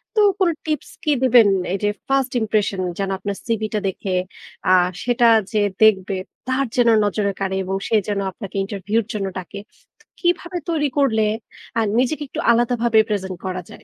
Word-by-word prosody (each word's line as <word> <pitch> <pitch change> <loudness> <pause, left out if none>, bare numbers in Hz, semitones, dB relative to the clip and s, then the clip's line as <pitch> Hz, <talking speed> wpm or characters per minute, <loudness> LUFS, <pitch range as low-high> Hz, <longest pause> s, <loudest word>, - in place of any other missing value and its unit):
তো - - +3 0.2
কোন 375 -3 +4 0.2
টিপস 310 -1 -2
কি 305 - +2
দিবেন? 245 -4 +6 0.3
এই - - 0
যে 205 - +3 0.2
first 270 -1 +1
impression 210 -3 0 0.2
যেন 195 -1 -2
আপনার 200 +1 -4
সিভিটা 215 -2 -1
দেখে, 190 0 -3 0.6
আ - - +5 0.3
সেটা 240 -1 +3 0.2
যে 215 - +1 0.2
দেখবে, 195 -2 +4 0.3
তার 260 +1 +1
যেন 245 -1 +3 0.2
নজরে 205 0 0
কাড়ে 190 -1 -1
এবং 190 +1 -3
সে - - +1
যেন 205 -1 -1
আপনাকে 190 +1 -9
ইন্টারভিউ 200 +2 -3
এর - - -25
জন্য 200 -2 -2
ডাকে। 185 +2 -7 0.6
কিভাবে 350 0 0
তৈরি 310 -3 +1
করলে 235 -6 +3 0.6
আ - - +3 0.2
নিজেকে 285 +4 0
একটু - - -6
আলাদাভাবে 235 -1 +2
প্রেজেন্ট 190 -3 -2
করা 185 -1 -3
যায়? - - -13
220 Hz, 170 wpm, -21 LUFS, 200-255 Hz, 0.6 s, দিবেন